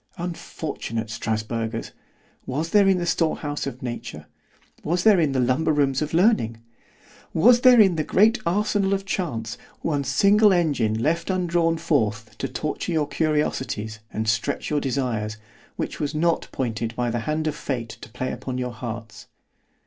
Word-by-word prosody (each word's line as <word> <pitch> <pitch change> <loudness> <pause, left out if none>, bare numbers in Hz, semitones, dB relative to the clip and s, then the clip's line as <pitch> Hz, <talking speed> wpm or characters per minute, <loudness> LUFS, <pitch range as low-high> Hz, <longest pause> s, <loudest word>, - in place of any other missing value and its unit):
—— - - -32
Unfortunate 160 - -5
Strasbergers! 110 +1 -3 0.6
was 155 +6 -2
there 205 -2 +5
in 190 -1 +4
the 175 - -2
store 165 -1 +1
house 145 -2 -4
of 130 -2 -7
nature——was 120 - -6
there 215 -4 +6
in 155 -4 +2
the 135 - 0
lumber 130 +6 +2
rooms 140 -2 +1
of 150 0 -2
learning——was 165 - +1
there 250 -2 +7
in 190 -6 +5
the 155 - +1
great 220 +9 +3
arsenal 200 +1 +1
of 195 0 -5
chance, 125 - -3 0.2
one 145 -3 0
single 200 +10 +4
engine 145 - +1
left 160 - 0
undrawn 170 -3 +1
forth 115 -10 -1
to - - -1
torture - - -3
your 155 -2 +1
curiosities, 130 -9 -1
and 110 +1 -3
stretch 110 +6 -1
your 150 -1 +1
desires, 120 -6 -2 0.4
which - - -4
was 150 +1 -2
not 165 +2 +1
pointed 115 -2 -3
by 120 -1 -1
the 120 - -1
hand 155 +1 0
of 155 - 0
Fate 125 -6 -4
to - - -10
play 130 +3 -4
upon 130 -1 -5
your 125 -1 -3
hearts? 115 -1 -7
145 Hz, 160 wpm, -24 LUFS, 115-170 Hz, 0.6 s, there